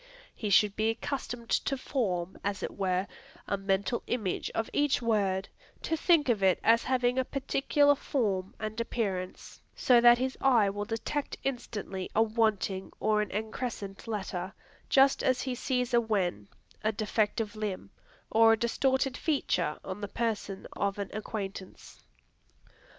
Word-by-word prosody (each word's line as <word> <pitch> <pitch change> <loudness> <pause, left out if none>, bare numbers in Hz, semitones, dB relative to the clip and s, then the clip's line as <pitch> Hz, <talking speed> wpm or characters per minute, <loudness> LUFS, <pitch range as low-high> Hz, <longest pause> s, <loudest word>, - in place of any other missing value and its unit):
He 215 - -4
should 200 +1 +4
be 215 +1 +1
accustomed 240 0 -4
to 275 - +1
form, 190 -10 -2
as 200 -1 -2
it - - -2
were, 185 -1 0 0.4
a 200 - +1
mental 195 +4 0
image 215 -7 -1
of 225 - 0
each 290 -1 +2
word, 200 -5 +1 0.4
to 325 - 0
think 325 -2 +3
of 230 -5 +2
it 190 -1 +4
as 230 +1 +4
having 250 -1 +1
a - - +3
particular 285 +2 +2
form 205 -10 -1
and 215 +1 -3
appearance, 195 -6 -4
so 245 -2 +5
that 240 0 +8
his 260 +1 -2
eye 235 -7 +4
will 205 +1 -4
detect 230 +6 -3
instantly 210 -7 -4
a 225 - +5
wanting 215 -4 0
or 215 0 +2
an 210 - -3
excrescent 215 -1 -5
letter, 190 -4 -3 0.4
just 270 0 +5
as 255 0 +2
he 260 - -2
sees 250 0 -1
a 240 - +5
wen, 185 - -1 0.4
a 215 - +2
defective 215 0 -1
limb, 210 -3 -4 0.4
or 225 0 +6
a - - +2
distorted 265 +3 +1
feature 185 - 0
on 190 +2 -5
the 205 - -3
person 210 -3 -3
of 200 0 -1
an 200 -1 -4
acquaintance. 200 -3 -6
220 Hz, 150 wpm, -30 LUFS, 195-245 Hz, 0.4 s, that